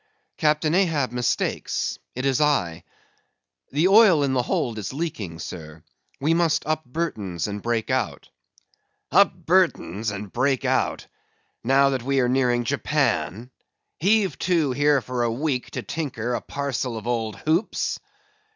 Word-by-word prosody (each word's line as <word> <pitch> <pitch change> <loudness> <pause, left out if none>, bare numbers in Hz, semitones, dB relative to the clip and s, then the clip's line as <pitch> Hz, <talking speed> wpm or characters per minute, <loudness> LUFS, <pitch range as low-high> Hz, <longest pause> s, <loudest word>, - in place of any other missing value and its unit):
"Captain 155 0 +2
Ahab 165 -9 +2
mistakes; 125 -2 -1 0.2
it 130 +2 -3
is 135 0 +2
I. 90 - +1 0.9
The 155 +6 +3
oil 195 -7 +6
in 135 -2 +1
the 125 - +2
hold 120 -2 -1
is 100 - -5
leaking, 125 - -4
sir. 80 -2 -8 0.4
We 150 +4 +2
must 165 -2 +1
up 155 0 -1
Burtons 110 - -3
and 105 0 -5
break 115 -1 -1
out." - - -2 0.8
"Up - - +6
Burtons 105 +5 +1
and 100 -1 -7
break 135 -1 +1
out? - - 0 0.6
Now 135 +3 +4
that 130 -2 -1
we 135 +2 0
are 125 - +3
nearing 125 -1 +2
Japan; 110 - -1 0.5
heave 200 +2 +2
to 165 -6 +1
here 145 +1 +3
for 125 0 -3
a 120 -1 +1
week 130 +1 -2
to 125 - -3
tinker 125 -2 -3
a - - -1
parcel 130 -4 -3
of 110 - -8
old 115 -3 -1
hoops?" 165 +7 -1
130 Hz, 145 wpm, -24 LUFS, 115-150 Hz, 0.9 s, oil